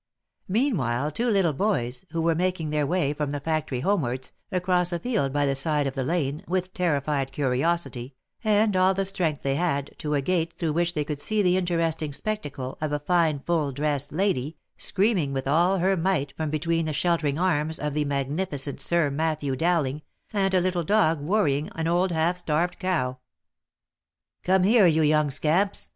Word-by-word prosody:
Meanwhile, 155 - 0
two 235 +11 -1
little 190 -7 +2
boys, 130 - -1
who 165 +1 -2
were 165 0 +3
making 170 -2 -1
their 150 -2 0
way 160 -4 +1
from 150 -1 -2
the 145 - -3
factory 150 -4 -2
homewards, 130 -9 -1 0.2
across 180 -1 +1
a 175 - 0
field 210 - -1
by 145 +1 +1
the 140 - +1
side 145 +2 0
of 135 - -2
the 135 - -3
lane, 145 -1 -1
ran 185 - -15
with 185 +1 -2
terrified 145 -5 0
curiosity, 135 -1 -1 0.3
and 210 -1 +3
all 185 +1 +4
the 195 0 0
strength 180 -7 -1
they 135 - +1
had, 140 -3 -1
to 150 -1 -1
a 140 - +1
gate, 170 0 0
through 160 -3 -1
which 175 +2 0
they 150 - 0
could 145 -1 -5
see 215 +3 +1
the 180 -1 +3
interesting 165 -4 -1
spectacle 140 -9 -4
of 155 -1 -1
a 150 - +1
fine 155 -1 +1
full 160 -4 0
dressed 145 0 -2
lady, 155 -4 -1 0.2
screaming 190 -8 +1
with 135 0 -3
all 175 +7 +3
her 190 +2 +2
might 165 -6 0
from 160 -1 -2
between 165 +2 0
the 155 - -2
sheltering 160 -3 +1
arms 160 -3 0
of 150 -1 -3
the 150 0 +1
magnificent 140 0 -2
Sir 170 -4 +3
Matthew 150 -2 -1
Dowling, 155 -3 0 0.3
and 195 -2 +1
a 185 - +4
little 180 -1 0
dog 165 -4 +2
worrying 150 -4 +1
an 160 - -2
old 175 +2 +2
half 170 +2 +1
starved 175 0 -1
cow. 130 -9 -1 0.6
" - - -63
Come 190 0 +3
here, 210 -1 +6
you 160 -1 +3
young 150 0 +3
scamps 160 +8 0
160 Hz, 185 wpm, -25 LUFS, 145-180 Hz, 0.6 s, here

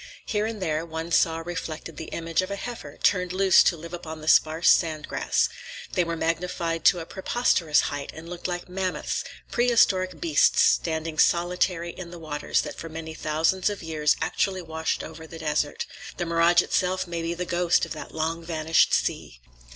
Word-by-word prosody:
Here 210 -1 0
and 225 -1 -5
there 160 -4 -1
one 165 0 -6
saw 165 -1 +3
reflected 165 -2 -5
the 160 - -6
image 165 +1 -1
of 185 - -5
a 200 - -2
heifer, 240 +3 -7
turned 180 -2 +2
loose 190 0 +5
to 170 - +3
live 165 +2 -10
upon 160 -2 -7
the 155 - -10
sparse 160 +1 +4
sand 155 -2 +3
grass. - - +1 0.4
They 180 - +2
were 170 0 -3
magnified 165 0 -2
to 180 -1 +5
a - - -7
preposterous 185 -5 +1
height 145 -1 -4
and 160 +1 -10
looked 175 +1 -5
like 175 -1 -4
mammoths, 185 0 -2 0.3
prehistoric 195 -8 +3
beasts 155 -2 +4
standing 160 -1 +1
solitary 175 0 +2
in 180 -1 -9
the 175 - -9
waters 155 -3 -1
that - - -7
for 165 - -7
many 160 0 -7
thousands 160 +5 +1
of 205 -3 -6
years 155 -2 +1
actually 190 -2 -1
washed 160 -1 -2
over 160 0 -9
that 165 0 -10
desert;—the 150 +3 -3
mirage 170 +1 +4
itself 185 0 0
may 170 -1 -4
be 165 +1 -2
the 180 +1 -3
ghost 175 0 +2
of - - -13
that 155 - -7
long 165 +1 -2
vanished 160 -1 +2
sea. - - -2
170 Hz, 180 wpm, -25 LUFS, 160-180 Hz, 0.4 s, loose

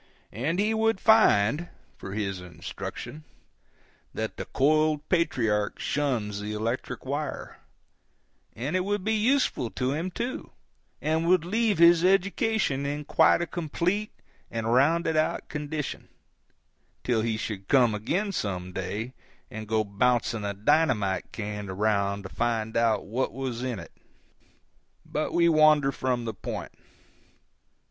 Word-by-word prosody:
And 140 - -1
he 210 +3 +2
would 220 -2 +1
find, 170 - +4 0.3
for 95 - -8
his 95 -3 -2
instruction, 90 - -7 0.9
that 110 0 -3
the - - -5
coiled 155 +1 +2
patriarch 115 - +1
shuns 120 -8 -1
the 105 +1 -4
electric 115 +6 -3
wire; 145 +2 -4 1.0
and 135 +9 -3
it - - +3
would 205 0 -1
be 220 +2 +1
useful 220 - +1
to 130 0 0
him, 165 +5 -2
too, 240 +7 -4 0.5
and 160 +2 +1
would 180 -2 +4
leave 220 +2 +1
his 170 0 +6
education 195 - +2
in 145 +1 -3
quite 160 +2 +4
a - - -1
complete 175 +5 -2 0.4
and 115 0 -1
rounded 160 +5 +3
out 155 - 0
condition, 150 -1 -4 1.0
till 120 -3 +1
he 110 -1 -1
should 100 -3 -5
come 125 -5 +4
again, 175 - -1
some 90 - -3
day, 105 +7 -4 0.4
and 110 0 -7
go 110 0 +1
to 100 - -14
bouncing 115 0 +1
a 100 0 -3
dynamite 105 -4 +1
can 105 -2 -5
around 100 0 0
to 95 - -7
find 115 -2 -1
out 115 -1 +2
what 120 +7 -1
was 130 -3 -4
in 125 -3 -2
it. 85 - -10 1.1
But 155 - -2
we 170 0 +3
wander 155 -3 +5
from 125 -3 -2
the 110 - -3
point. 100 - -6
130 Hz, 140 wpm, -27 LUFS, 110-170 Hz, 1.1 s, his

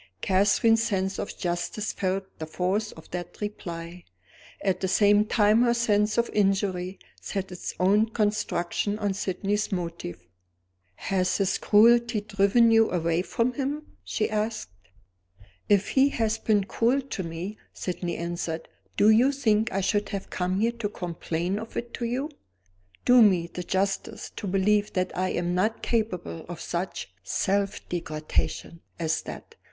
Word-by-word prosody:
Catherine's 205 +4 +3
sense 195 -4 -1
of - - -5
justice 175 +4 -2
felt 190 0 -1 0.2
the 155 - -5
force 190 +6 -1
of 160 - -14
that 175 0 -6
reply. 175 -4 -6 0.6
At 190 -2 0
the 190 - -1
same 205 +2 +4
time 215 +1 +4
her 240 -1 +3
sense 210 -2 +2
of 235 0 +3
injury 195 -2 +1 0.2
set 195 -2 -4
its 180 - -6
own 205 +4 +4
construction 210 -2 -1
on 205 -2 -1
Sydney's 200 +2 -1
motive. 170 - -4 0.7
"Has 185 -2 0
his 195 -2 +1
cruelty 235 +1 +5
driven 205 +3 +3
you 225 0 +5
away 170 -1 +1
from 230 +6 0
him?" 290 +3 -4
she 215 - -1
asked. 215 - -2 1.0
"If 205 -1 +3
he 270 +1 +4
has 225 -4 0
been 210 -3 +2
cruel 240 +7 +1
to 255 -7 -5
me," 175 +5 -6
Sydney 175 -1 -4
answered, 170 -1 -4 0.3
"do 215 - +6
you 245 +5 +5
think 225 -6 +1
I 195 - 0
should 205 +2 0
have 200 -1 -5
come 185 +2 -1
here 230 +1 +3
to 235 -3 -4
complain 175 +1 -3
of 225 +1 -8
it 235 0 -4
to 240 - -3
You? 260 +6 -2 0.7
Do 245 0 +7
me 185 -6 +5
the 180 - -4
justice 190 +2 -2
to 205 - -5
believe 205 +2 +2
that 185 0 -1
I 185 0 0
am 175 0 -1
not 210 +5 0
capable 190 - -2
of 175 -2 -6
such 170 - -4
self 195 - -1
degradation 160 0 -3 0.2
as 160 -1 0
that. - - -9
200 Hz, 150 wpm, -26 LUFS, 180-220 Hz, 1.0 s, Do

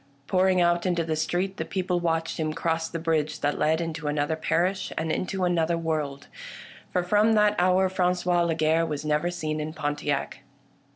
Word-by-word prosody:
Pouring 185 +2 +2
out 175 +1 +2
into 175 -2 +1
the 160 -1 -1
street, 175 +5 -1
the - - -2
people 180 -2 -1
watched 165 -1 -1
him 155 -1 -1
cross 165 0 -1
the 165 - -4
bridge 155 -2 -1
that 145 +1 0
led 160 +1 +2
into 165 -2 -4
another 150 +1 0
parish 180 +4 0
— - - -26
and 160 0 -1
into 185 +3 -2
another 170 -1 +1
world: 155 -4 -3 0.7
for 180 - +1
from 210 +4 +3
that 210 -1 +4
hour 185 +1 +3
Franqois 180 -1 +1
Lagarre 160 0 +2
was 150 -1 -4
never 150 +3 +1
seen 155 -3 -3
in 155 +1 -5
Pontiac. 145 -2 -2
165 Hz, 180 wpm, -26 LUFS, 155-180 Hz, 0.7 s, that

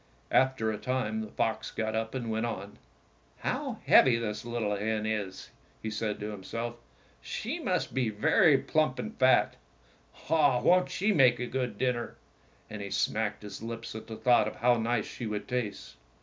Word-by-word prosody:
After 130 -4 +3
a 105 - -4
time 115 -4 -1
the 110 - -5
fox 110 +1 -1
got 110 -1 -2
up 110 +2 -2
and 120 -3 -3
went 110 +1 0
on. 100 -2 -6 0.6
"How - - -3
heavy 125 -3 +6
this 105 -2 -3
little 115 -3 -1
hen 110 +1 -1
is!" 105 -4 -3 0.3
he 110 - -4
said 105 -1 -2
to 105 +1 -3
himself. 115 +4 -5 0.5
"'She - - -4
must - - -1
be 125 -3 +1
very 150 - +4
plump 155 +3 +1
and 220 - -5
fat. 130 0 +4 0.7
Ah, 145 -6 +4
won't 180 +8 +4
she 205 +4 +1
make 125 -7 +5
a 125 - -1
good 125 0 -3
dinner! 125 -2 -1 0.3
" - - -33
And 105 -1 -7
he 100 - -5
smacked 105 +1 -1
his 105 -1 -8
lips 115 0 -6
at 110 - -8
the 110 - -6
thought 120 -4 +4
of - - -5
how 120 +1 +3
nice 115 -1 0
she 120 - -6
would 105 -1 -4
taste. 125 -5 -4
115 Hz, 180 wpm, -29 LUFS, 110-125 Hz, 0.7 s, heavy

